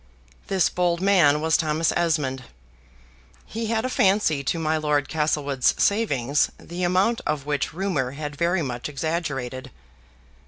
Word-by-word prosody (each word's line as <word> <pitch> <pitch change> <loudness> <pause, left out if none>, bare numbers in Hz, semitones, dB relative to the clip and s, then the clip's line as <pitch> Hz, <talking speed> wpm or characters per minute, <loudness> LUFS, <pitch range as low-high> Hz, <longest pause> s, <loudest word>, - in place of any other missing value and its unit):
This 190 -3 +2
bold 175 -1 0
man 175 -7 +4
was 160 0 +2
Thomas 155 0 0
Esmond. 145 -7 0 1.0
He 225 +1 -4
had 225 +1 0
a - - +1
fancy 190 - +2
to 170 - 0
my 160 -1 0
Lord 150 -3 0
Castlewood's 145 -4 0
savings, 145 - +1
the 175 +2 -8
amount 185 +6 +2
of 150 -2 -2
which 145 -2 -1
rumor 155 -8 -2
had 145 0 -6
very 170 +3 +1
much 125 0 -4
exaggerated. 140 -4 -3
155 Hz, 135 wpm, -24 LUFS, 145-180 Hz, 1.0 s, man